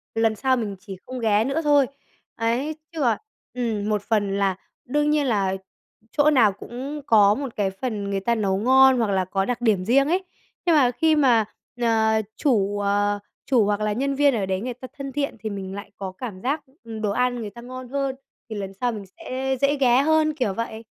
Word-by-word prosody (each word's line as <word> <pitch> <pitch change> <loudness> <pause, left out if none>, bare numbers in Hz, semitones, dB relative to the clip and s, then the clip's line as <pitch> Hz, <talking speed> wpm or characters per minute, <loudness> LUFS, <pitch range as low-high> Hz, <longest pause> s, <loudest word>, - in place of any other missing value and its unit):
lần 225 -1 +2
sau 260 +3 +1
mình 205 -4 -3
chỉ 190 -1 -9
không 255 0 -6
ghé 220 -2 +3
nữa 275 +6 -1
thôi. 290 -3 +4 0.5
Ấy, 245 +7 -1 0.2
chứ 320 - -5
còn 235 -5 +3 0.4
ừm, 220 -4 -2
một 210 -1 +1
phần 200 -2 0
là 195 -2 +1 0.3
đương 295 +3 +1
nhiên 300 -2 +2
là 195 -5 +1 0.6
chỗ 300 0 +4
nào 235 -8 +5
cũng 265 +8 -7
có 205 -2 +5
một 270 -2 -5
cái 200 -2 +1
phần 205 -1 -4
người 195 - 0
ta 235 +5 0
nấu 195 -3 0
ngon 260 +4 +6
hoặc 225 -4 +1
là 190 -1 +1
có 195 +1 -1
đặc 245 +1 -2
điểm 205 -6 +2
riêng 275 +6 +4
ấy, 370 +2 +1 0.4
nhưng 335 -3 +4
mà 255 -4 +5
khi 315 +5 +2
mà, 245 -7 +4 0.4
ờ, 220 -1 +3 0.2
chủ, 205 -8 +1
ờ, 205 0 +1 0.3
chủ 245 -6 +3
hoặc 205 0 0
là 210 0 0
nhân 275 +4 -1
viên 285 0 +4
ở 205 -4 0
đấy 190 0 -2
người 250 +1 -3
ta 255 +2 -10
thân 275 -1 -5
thiện, 280 -3 -2
thì 220 - -4
mình 195 -1 -6
lại 200 - -8
có 190 -1 -5
cảm 205 -6 -6
giác, 285 +7 -1 0.2
ừm, 225 -1 -7
đồ 210 -2 0
ăn 250 +3 +1
người 215 - -5
ta 235 +4 -12
ngon 255 +1 -8
hơn 275 0 -1 0.3
thì 220 - -5
lần 195 -2 -5
sau 245 - +2
mình 210 -3 -7
sẽ 260 +7 -4
dễ 285 +1 +3
ghé 255 -1 +5
hơn, 310 +1 +3
kiểu 250 -9 0
vậy. 225 +1 -5
230 Hz, 220 wpm, -24 LUFS, 205-265 Hz, 0.6 s, ngon